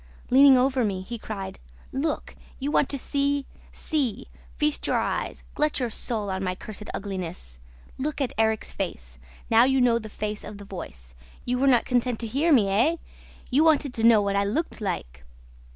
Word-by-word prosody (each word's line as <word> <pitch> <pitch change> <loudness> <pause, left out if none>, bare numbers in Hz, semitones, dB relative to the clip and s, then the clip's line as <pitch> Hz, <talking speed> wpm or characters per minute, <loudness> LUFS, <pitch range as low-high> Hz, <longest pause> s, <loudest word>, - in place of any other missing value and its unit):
Leaning 270 +1 +8
over 260 0 +2
me, 195 -4 -1
he 235 +3 -6
cried, 200 -4 -6 0.3
'Look! 300 +4 -2 0.2
You 280 +2 -2
want 290 - +2
to 280 - -1
see! 280 +1 0 0.3
See! 265 - -2 0.3
Feast 300 0 0
your - - +2
eyes, - - -2
glut 300 -1 +1
your 245 -3 -1
soul 215 -3 -3
on 190 0 -2
my 185 -1 -1
cursed 210 +2 -8
ugliness! 180 - -5 0.4
Look 295 +2 -2
at 270 -4 -1
Erik's 220 -1 +1
face! 65 - -5 0.3
Now 225 +1 +7
you 265 +1 +3
know 240 -2 +4
the 220 -1 -9
face 210 0 -4
of 210 - -8
the 205 - -10
voice! 65 - -9 0.3
You 250 0 0
were 275 - +3
not 245 -3 +4
content 245 -1 +1
to - - -2
hear 280 +9 +1
me, 230 -9 +5
eh? 235 +12 +3 0.6
You 280 +5 +4
wanted 300 -4 +3
to 225 - -3
know 225 -3 +6
what 200 0 0
I 200 - +3
looked 235 +8 -2
like! 65 - -4
230 Hz, 185 wpm, -26 LUFS, 200-270 Hz, 0.6 s, Leaning